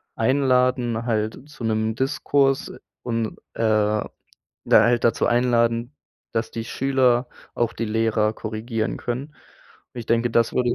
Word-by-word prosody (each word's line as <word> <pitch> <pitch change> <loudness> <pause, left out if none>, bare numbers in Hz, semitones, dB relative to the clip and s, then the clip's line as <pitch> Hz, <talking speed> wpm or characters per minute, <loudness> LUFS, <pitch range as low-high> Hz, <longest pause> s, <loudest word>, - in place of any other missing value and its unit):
einladen 125 -2 +1
halt, 110 -2 -1
zu 135 - -11
'nem 110 0 0
Diskurs 135 +1 +1 0.3
und, 115 -2 -2 0.2
äh, - - -4
da 105 -1 +2 0.7
halt 120 +1 +5
dazu 115 -1 +2
einladen, 120 +1 +1 0.4
dass 115 0 -1
die 115 -1 -4
Schüler 130 -1 +1 0.3
auch 120 -1 0
die 115 - -3
Lehrer 110 0 +1
korrigieren 110 +1 -3
können. 125 +3 -3 0.7
Und 120 - -5
ich 115 - -9
denke, 115 +1 +1
das 115 0 +2
würde, 120 -1 +1
115 Hz, 135 wpm, -23 LUFS, 110-125 Hz, 0.7 s, halt